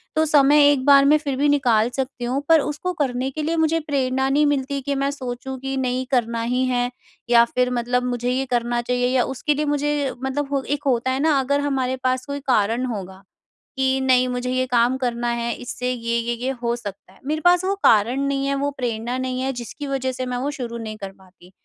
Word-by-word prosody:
तो 315 0 +3
समय 290 -1 +5
एक 265 -2 0
बार 280 -1 +7
मैं 300 +2 +6
फिर 285 -3 -3
भी 290 +1 +2
निकाल 240 -6 +3
सकती 265 -2 -4
हूँ, 260 +3 -1
पर 325 - +7
उसको 300 +5 -3
करने 260 -4 -1
के 305 +2 -4
लिए 330 +2 0
मुझे 320 0 +2
प्रेरणा 265 -3 0
नहीं 290 +2 +3
मिलती 280 -1 0
कि 280 +1 -2
मैं 275 0 0
सोचूँ 260 -1 -6
कि 270 +1 -4
नहीं, 255 0 -1
करना 235 -2 0
ही 250 +2 0
है, 245 -1 0 0.4
या 235 -1 +7
फिर 250 +1 0
मतलब 245 +1 0
मुझे 245 -1 -2
ये 265 +1 0
करना 240 0 0
चाहिए, 245 +1 0
या 250 - +4
उसके 270 +3 -1
लिए 300 +1 -1
मुझे 290 -1 0
मतलब 275 +2 -2
हो 275 - +1
एक 290 +1 -3
होता 260 -1 +1
है 260 - -1
ना, 300 -1 +3
अगर 280 +2 +1
हमारे 265 -3 -1
पास 255 0 0
कोई 285 -1 -4
कारण 230 0 +2
होगा 195 -5 -6 0.5
कि 265 0 +1
नहीं, 255 -1 +3
मुझे 250 0 -3
ये 255 0 +1
काम 245 +1 +2
करना 240 -2 -2
है, 235 0 -1
इससे 250 +1 -4
ये-ये, 235 -1 -1
ये 265 - 0
हो 235 0 +1
सकता 205 -5 -9
है। - - -22
मेरे 310 +2 -2
पास 355 +2 +4
वो 390 +1 0
कारण 230 +5 +4
नहीं 275 0 -1
है, 275 - 0
वो 280 +1 -1
प्रेरणा 240 0 -2
नहीं 255 0 -3
है, 265 +1 -1
जिसकी 250 +4 -7
वज़ह 265 -1 -1
से 255 0 -4
मैं 250 -1 -3
वो 275 +3 -2
शुरू 245 -5 -5
नहीं 220 -2 -6
कर 195 -2 -7
पाती। 185 -1 -20
260 Hz, 225 wpm, -22 LUFS, 240-280 Hz, 0.5 s, बार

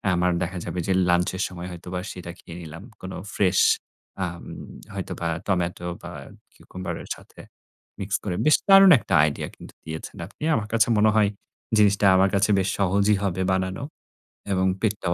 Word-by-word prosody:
আমার 90 +1 +2
দেখা 90 +1 -3
যাবে 90 - -4
যে 95 - +2 0.2
লাঞ্চ 90 0 +3
এর 95 - 0
সময় 90 -1 -8
হয়তোবা 90 +1 -6
সেটা 90 -2 -8
খেয়ে 85 - -11
নিলাম। 85 +2 -9 0.2
কোন 95 - -7 0.2
ফ্রেশ 95 -2 +2 0.7
আম 85 -1 -7 0.5
হয়তোবা 85 - -4 0.2
টমেটো 90 -2 -1
বা - - -8 0.4
কিউকাম্বার 90 0 -7
এর - - -14
সাথে - - -18 0.6
মিক্স 100 0 -2
করে 95 -4 -2
বেশ 155 - +6
দারুণ 195 -1 +9
একটা 95 - -5
আইডিয়া 75 -1 -1
কিন্তু - - -13
দিয়েছেন 80 0 -7
আপনি। - - -12
আমার 110 -1 -2
কাছে 115 0 +4
মনে 105 +1 +5
হয় 105 -2 +4 0.5
জিনিসটা 100 -1 +4
আমার 95 +1 +4
কাছে 100 +1 +2
বেশ 95 0 0
সহজই 100 +2 +3
হবে 95 -1 -1
বানানো 95 +3 -1 0.7
এবং 95 -1 +2 0.2
পেটটাও 100 -5 0
95 Hz, 165 wpm, -24 LUFS, 90-100 Hz, 0.7 s, দারুণ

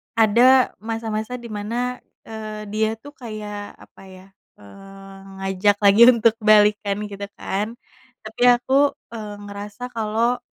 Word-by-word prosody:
ada 240 +4 +5
masa-masa 225 +1 -4
di 235 -2 -9
mana, 235 +4 -3 0.2
eee, 215 -1 -7
dia 215 0 0
tuh 285 +6 -14
kayak, 215 -7 -8
apa - - -18
ya, 185 0 -14 0.3
eee, 195 - -14 0.2
ngajak 195 +1 +1
lagi 200 +3 +5
untuk 230 -2 +4
balikkan, 210 -1 +3 0.2
gitu 200 0 -6
kan. 210 +4 -4 0.5
Tapi 220 +2 -10
aku, 270 +4 +1 0.2
eee, 215 -3 -7
ngerasa 205 +4 -8
kalo, 230 +2 -1
215 Hz, 125 wpm, -21 LUFS, 205-235 Hz, 0.5 s, ada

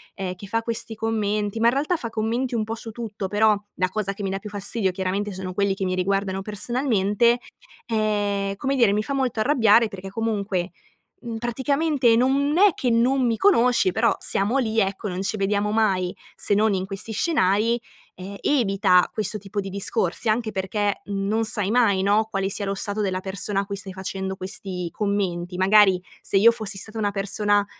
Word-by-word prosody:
ehm, 190 -2 -4
che 185 +2 -11
fa 225 +3 -1
questi 225 -1 -4
commenti, 215 -1 -1
ma 230 - +4
in 235 - +4
realtà 295 +6 0
fa 235 -8 -5
commenti 235 +3 -2
un 220 - 0
po' 220 +1 -4
su 225 0 -8
tutto, 215 -3 -5
però 210 +2 +3 0.2
la 185 0 0
cosa 200 0 -2
che 200 - -7
mi 195 - -2
dà 195 - -3
più 210 - -8
fastidio 200 0 0
chiaramente 190 +3 -2
sono 185 -1 -6
quelli 200 0 +1
che 195 -1 -3
mi 185 - -1
riguardano 195 +1 -1
personalmente, 225 +1 +1 0.5
ehm, 205 -3 -1
come 270 +6 -1
dire, 235 -6 +4
mi 210 +1 0
fa 280 - -4
molto 255 -5 0
arrabbiare 225 -3 +4
perché 195 -1 -8
comunque, 200 -4 -2 0.5
mhmm, 230 -2 -5
praticamente 265 +2 +1
non 275 +5 +2
è 400 -1 +6
che 255 - -1
non 245 +3 +2
mi 230 -1 0
conosci, 245 - +3
però - - +2
siamo 210 +7 0
lì, 225 -4 0
ecco, 195 +1 -1
non 185 -1 -3
ci 195 +2 -2
vediamo 205 +1 0
mai, 195 -5 +1 0.2
se 205 - +1
non 215 +1 +3
in 190 0 -2
questi 195 +3 -5
scenari, 220 - +1 0.4
ehm, 195 +2 -8
evita 195 -9 +3
questo 215 0 -2
tipo 205 0 -5
di 195 -1 -4
discorsi 195 +1 -1
anche 220 0 0
perché 200 +2 -1
non 200 +2 -1
sai 210 -3 0
mai, 215 -5 +3
no, 205 +3 +2
quale 195 -1 -1
sia 200 - -1
lo 195 - -1
stato 205 +2 -2
della 190 -2 -1
persona 195 +1 -2
a - - -6
cui 200 0 -5
stai 195 -1 -5
facendo 190 0 -4
questi 185 -2 -5
commenti. 185 -4 -2
Magari, 190 -1 +5 0.2
se 195 - 0
io 230 +4 +7
fossi 215 -4 -4
stata 220 +3 -4
una 205 -2 0
persona 205 +1 +1
205 Hz, 195 wpm, -23 LUFS, 195-225 Hz, 0.5 s, io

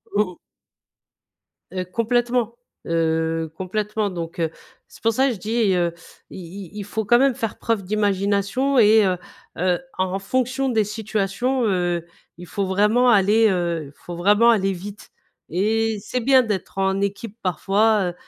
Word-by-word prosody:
Mmh 210 - +4
mh. 180 - -13 1.3
Heu, 185 0 -3
complètement 235 +4 0 0.3
heu, 160 -1 0
complètement 210 +2 -2
donc, 170 -1 -6
heu, 165 - +1 0.4
c'est - - -17
pour 225 - +4
ça 265 +4 +2
je - - -3
dis, 215 0 +1
heu, 175 -2 +1 0.4
il - - -9
il 180 +1 -9
il 205 - -5
faut 220 +2 -3
quand 240 +4 +4
même 270 -1 +3
faire 225 -4 -4
preuve 225 -4 -1
d'imagination. 205 +6 0
Et 215 0 +6
heu, 185 -2 +1 0.4
heu, 180 +1 +1 0.2
en 185 +1 -1
fonction 255 +5 -1
des 225 -3 +2
situations, 215 +4 -1
heu, 175 -4 0 0.3
il 175 - -10
faut 200 +2 -2
vraiment 210 +6 +3
aller, 215 +1 +5
heu 170 -4 -1
il - - -14
faut 175 +4 -9
vraiment 205 +6 +4
aller 195 -4 +3
vite. 195 +3 -9 0.4
Et 220 +4 0
c'est 250 - -3
bien 260 +1 +5
d'être 205 -4 -4
en 195 0 +1
équipe 200 +2 -3
parfois, 195 +2 +1
205 Hz, 160 wpm, -22 LUFS, 185-225 Hz, 1.3 s, Et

